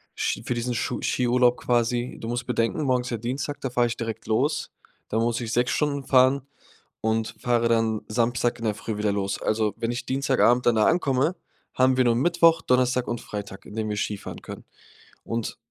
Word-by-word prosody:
Sch - - -1
für - - -1
diesen 120 +1 -2
Schu 115 - -2
Skiurlaub, 125 0 +2
quasi. 120 0 0
Du 115 - -6
musst 120 0 -2
bedenken, 120 +4 0
morgen 130 -3 +2
ist 125 - -6
ja 115 - -1
Dienstag, 130 +6 -4
da 135 - -2
fahre 120 0 +2
ich 120 - -4
direkt 115 -2 -5
los. 140 +8 0 0.4
Da 110 - -1
muss 115 +1 +1
ich 115 -1 -4
6 120 +1 +2
Stunden 145 -2 0
fahren 130 +1 +4 0.6
und 110 0 -1
fahre 120 -1 +2
dann 115 -2 +1
Samstag 120 +1 0
in 115 - -7
der 105 - +1
Früh 105 0 -5
wieder 105 0 +1
los. 100 -1 -2
Also, 110 -1 +1
wenn 115 - -2
ich 120 - -4
Dienstagabend 130 -2 +2
dann 120 - +5
da 110 - +4
ankomme, 145 -1 +2 0.4
haben 130 0 +3
wir 130 - +4
nur 120 -1 +3
Mittwoch, 165 +4 +4
Donnerstag 125 0 +2
und 120 - -2
Freitag, 100 -2 -7
in - - -11
denen 110 -1 -2
wir 105 - -2
Skifahren 105 -1 -4
können. - - -9 0.6
Und 115 -1 -3
120 Hz, 205 wpm, -25 LUFS, 115-125 Hz, 0.6 s, dann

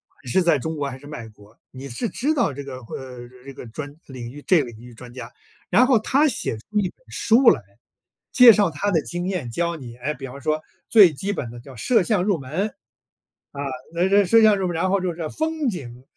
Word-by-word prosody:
管 130 - -18
是 190 - +3
在 170 -3 +4
中 160 +4 -4
国 145 -2 -2
还 130 - -8
是 145 - -15
外国， 110 -6 -11
你 130 +1 -9
是 130 - -3
知 280 - 0
道 240 - +1
这 140 +2 -7
个 135 -2 -7
呃， 125 0 -9 0.2
这 140 - -9
个 125 - -10
专 145 +5 -8
领 125 -3 -8
域 145 +3 -11
这 180 -4 +4
个 - - -8
领 110 - -14
域 120 +1 -13
专 120 +1 -12
家。 120 -2 -8 0.4
然 235 +8 +5
后 250 -4 +4
他 275 +7 +2
写 180 - -2
出 210 - -3
一 190 -3 0
本 - - -21
书 235 +2 +4
来， 140 - -1 0.7
介 250 -2 +9
绍 205 -4 +2
他 160 +8 -2
的 165 -4 +2
经 175 +1 -3
验 180 -11 -3
教 170 +6 -1
你， 120 -5 -10
哎， 140 +5 -3
比 135 - -8
方 135 +2 -10
说 155 +2 -1 0.3
最 200 -8 +7
基 195 +8 -3
本 120 - -5
的 120 - -10
叫 130 +2 -13
摄 230 - +2
像 195 -1 +1
入 200 -2 +1
门。 160 +11 -3 0.8
啊， 140 - -6 0.3
那 175 +3 +1
这 200 0 +5
摄 225 +5 +5
像 215 -2 +6
入 190 -1 -1
门 175 - -3
然 180 +3 0
后 200 +1 +2
就 185 - -1
是 - - -9
这 160 -3 -4
风 315 - -1
景 125 - -7
155 Hz, 265 characters per minute, -23 LUFS, 130-200 Hz, 0.8 s, 介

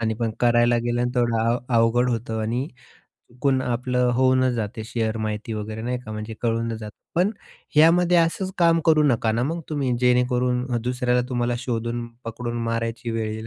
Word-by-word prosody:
आणि 110 -1 0
पण 115 0 -2
करायला 120 0 +4
गेल्यानंतर 120 +1 0
तेवढं 115 -1 0
अव 120 - +1 0.2
अवघड 115 +2 +3
होतं. 115 -1 -2
आणि 120 +5 -1 0.7
कोण 135 -2 +2
आपलं 125 0 0
होऊनच 130 0 +3
जाते 110 0 -4
शेअर 115 -1 -2
माहिती 105 +2 -4
वगैरे 110 +1 -5
नाही 125 +1 -2
का, 115 -3 -9
म्हणजे 110 +1 -6
कळूनच 115 -1 -1
जातं. 105 -1 -9 0.2
पण 180 +4 +3 0.5
यामध्ये 175 +3 +5
असंच 185 +3 0
काम 165 -1 +4
करू 155 -1 +5
नका 115 -5 +2
ना 115 - 0
मग 165 +6 -2
तुम्ही, 140 -5 -1
जेणेकरून 125 0 +2 0.2
दुसऱ्याला 125 0 +1
तुम्हाला 120 -1 0
शोधून 120 -1 -3 0.2
पकडून 120 +1 -4
मारायची 115 +1 -2
वेळ 110 -1 -2
येईल. 110 +1 -6
120 Hz, 170 wpm, -23 LUFS, 115-125 Hz, 0.7 s, यामध्ये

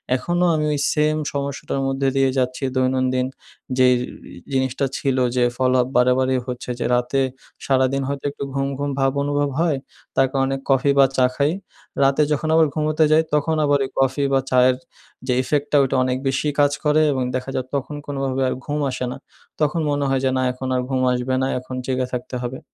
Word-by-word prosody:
এখনও 175 +6 0
আমি 155 -1 0
ওই 145 - -1
সেম 155 0 +2 0.2
সমস্যাটার 140 -1 -3
মধ্যে 135 0 0
দিয়ে 135 -1 +3
যাচ্ছি। 130 +1 -1
দৈনন্দিন 130 0 +1 0.5
যেই 130 -1 +5 0.4
ই - - -11 0.2
জিনিসটা 130 +1 0
ছিল 135 -2 0 0.2
যে, 125 - +3
follow-up 130 -1 +2
বারেবারেই 130 +1 +3
হচ্ছে 125 0 -6
যে, - - -1
রাতে 125 +3 0 0.4
সারাদিন 135 0 +2
হয়তো 140 0 -4
একটু 140 - -7
ঘুম, 135 0 0
ঘুম 145 0 -1
ভাব 135 0 +3
অনুভব 145 0 0
হয়। 165 -4 +2 0.4
তার 135 - +4
কারনে 135 0 0
কফি 135 +1 +3
বা, 135 - +7
চা 130 - +5
খাই। 145 +1 +2 0.5
রাতে 135 +2 +3
যখন 150 +1 0
আবার 160 -1 +5
ঘুমোতে 155 0 +1
যাই, 155 +1 +5
তখন 150 +2 +2
আবার 145 0 +3
ওই - - -7
কফি 135 +1 +1
বা, 135 - +4
চায়ের 125 0 +5 0.5
যে 125 - +2
effect 145 +2 0
টা, 150 - +4
ওটা 135 0 -1
অনেক 130 0 0
বেশি 135 +3 0
কাজ 145 0 +4
করে 150 0 +3
এবং 130 -2 -1
দেখা 130 +1 -3
যায় 130 - -1
তখন 140 +2 -3
কোনোভাবে 135 -2 -2
আর - - -1
ঘুম 150 0 -2
আসে 130 - -3
না। - - -6 0.4
তখন 150 +2 +1
মনে 145 0 0
হয় 135 -1 +1
যে, - - +3
না, - - +1
এখন 125 +1 -6
আর 125 - +1
ঘুম 130 -1 0
আসবে 125 +1 -1
না, 130 - +1
এখন 130 0 -8
জেগে 130 -1 -1
থাকতে 125 +1 -4
হবে। 125 +2 -4
135 Hz, 200 wpm, -21 LUFS, 130-145 Hz, 0.5 s, বা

